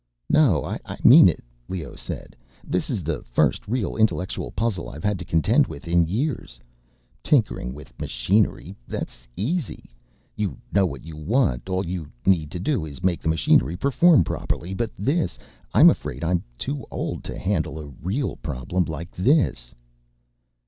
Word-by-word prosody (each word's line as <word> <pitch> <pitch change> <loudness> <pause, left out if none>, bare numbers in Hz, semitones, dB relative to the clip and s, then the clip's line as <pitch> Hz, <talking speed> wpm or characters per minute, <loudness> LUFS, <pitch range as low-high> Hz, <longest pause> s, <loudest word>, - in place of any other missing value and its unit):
"No, - - +4
I - - -4 0.2
mean - - +9
it," - - -4 0.3
Leoh 85 -7 -5
said. - - -7 0.3
"This - - -1
is - - -2
the - - -2
first - - 0
real 115 0 -1
intellectual 100 - 0
puzzle 105 - -2
I've 75 - -9
had 105 -3 0
to 90 - -6
contend 80 -2 +3
with 70 +4 -9
in 85 -1 +3
years. 110 - -2 0.6
Tinkering 60 - +1
with 70 -2 -12
machinery... 95 - 0
that's - - -5 0.2
easy. 135 - -3 0.4
You 100 -9 -2 0.2
know 95 -1 +4
what 70 -3 -8
you 80 -1 -8
want, 80 - 0
all 95 +1 0
you 85 -3 -4 0.2
need 85 -6 +2
is 90 - -2
to 90 - -5
make 90 -3 +1
the 80 - -1
machinery 80 +1 +3
perform 140 - +5
properly. 85 +3 -3
But 115 +3 -1
this... 140 - 0 0.3
I'm - - +8
afraid 65 +6 -5
I'm 85 +1 +1 0.2
too 140 - -3
old - - -4
to - - -6
handle 90 -5 -1
a 75 - -6 0.2
real 105 - -2
problem 75 +6 -2
like 80 +1 -6
this." 95 - +1
90 Hz, 155 wpm, -24 LUFS, 80-110 Hz, 0.6 s, mean